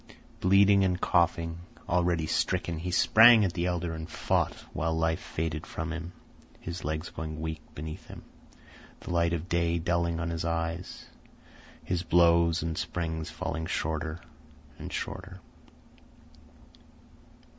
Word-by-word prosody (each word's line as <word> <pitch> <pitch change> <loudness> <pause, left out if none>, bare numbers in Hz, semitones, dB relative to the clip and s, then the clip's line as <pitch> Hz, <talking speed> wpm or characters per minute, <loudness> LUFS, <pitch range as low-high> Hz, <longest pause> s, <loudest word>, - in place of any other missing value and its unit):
Bleeding 100 +1 +5
and 90 -1 +1
coughing, 85 -1 +1 0.3
already 85 -2 +1
stricken, 85 0 -1
he 90 +3 -4
sprang 110 +4 +7
at 90 - -1
the 85 0 -1
elder 85 -1 -2
and 80 +1 -6
fought - - 0 0.2
while 80 0 -1
life 80 0 +1
faded 80 -1 -4
from 80 0 -4
him, 85 +1 -6 0.5
his 85 +1 -6
legs 80 +3 -3
going 80 -1 -6
weak 80 0 -4
beneath 80 +1 -7
him, - - -10 0.8
the - - -7
light 85 -1 +2
of 85 +1 -3
day 85 -1 +1
dulling 85 0 0
on 85 0 -2
his 80 -1 -3
eyes, 85 +1 -3 0.8
his 85 -1 -1
blows 85 -1 +4
and 80 -1 -2
springs 80 -2 -3
falling 80 0 -4
shorter 80 +1 -2 0.6
and - - -7
shorter. 95 0 -5
85 Hz, 135 wpm, -29 LUFS, 80-90 Hz, 0.8 s, sprang